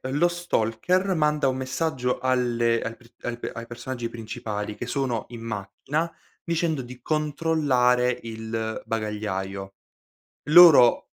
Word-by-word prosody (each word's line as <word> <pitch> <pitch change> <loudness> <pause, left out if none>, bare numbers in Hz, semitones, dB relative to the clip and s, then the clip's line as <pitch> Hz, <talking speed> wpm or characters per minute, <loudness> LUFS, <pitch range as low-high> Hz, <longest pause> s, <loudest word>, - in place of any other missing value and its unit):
lo 170 +5 +3
stalker 175 - 0
manda 150 -3 +2
un 130 - -1
messaggio 130 -1 -1
alle 120 -2 +1
al 115 - -4
pr 120 0 -21
al 120 0 -4 0.2
ai 115 0 -7
personaggi 120 0 -5
principali 105 -2 -5
che 125 - -5
sono 125 -3 -2
in 120 -1 -9
macchina 115 +10 -3 0.3
dicendo 165 -4 -1
di 125 0 -11
controllare 145 -5 +1
il 110 -1 -4
bagagliaio. 100 -3 -4 0.8
Loro 155 -7 +8
125 Hz, 120 wpm, -25 LUFS, 115-150 Hz, 0.8 s, Loro